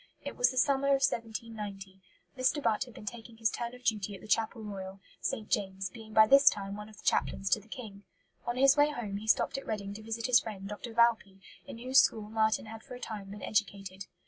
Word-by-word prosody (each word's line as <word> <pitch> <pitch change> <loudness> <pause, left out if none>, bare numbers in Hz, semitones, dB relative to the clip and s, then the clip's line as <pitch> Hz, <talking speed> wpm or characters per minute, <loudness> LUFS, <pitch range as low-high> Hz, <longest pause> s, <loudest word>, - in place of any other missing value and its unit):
It - - -5
was 245 - +4
the 255 - -6
summer 275 +1 +3
of 275 -1 +3
1790. 210 -4 -5 0.3
Mr. 255 +3 +2
Butt 230 -2 +1
had 245 -3 -15
been - - -10
taking 225 +1 -8
his 225 -1 +1
turn 235 +1 -4
of 250 - -16
duty 210 -3 0
at 190 - -12
the - - -11
Chapel 225 +1 0
Royal, 195 -2 -7 0.2
St. 215 - -3
James's, 190 -2 -1
being 225 -2 -11
by 220 0 +7
this 275 +5 +7
time 200 -1 -5
one 210 +1 -8
of 215 - -16
the - - -15
chaplains 195 0 0
to - - +4
the 210 - -19
King. 215 -5 -9 0.5
On 240 +1 -1
his 270 +1 +6
way 290 0 +5
home 220 -9 -4
he 215 +2 -8
stopped 225 - +2
at - - -13
Reading 200 -2 -3
to 215 - -9
visit 225 +1 -4
his 250 -1 +6
friend 200 -3 -7
Dr. 210 +3 -7
Valpy, 230 -5 +3 0.3
in - - -8
whose 255 +3 +4
school 215 -4 +2
Marten 220 0 +1
had 220 0 -9
for 255 0 -10
a - - -9
time 205 -5 -6
been 205 +1 -9
educated. 195 -3 -2
220 Hz, 235 wpm, -31 LUFS, 200-240 Hz, 0.5 s, by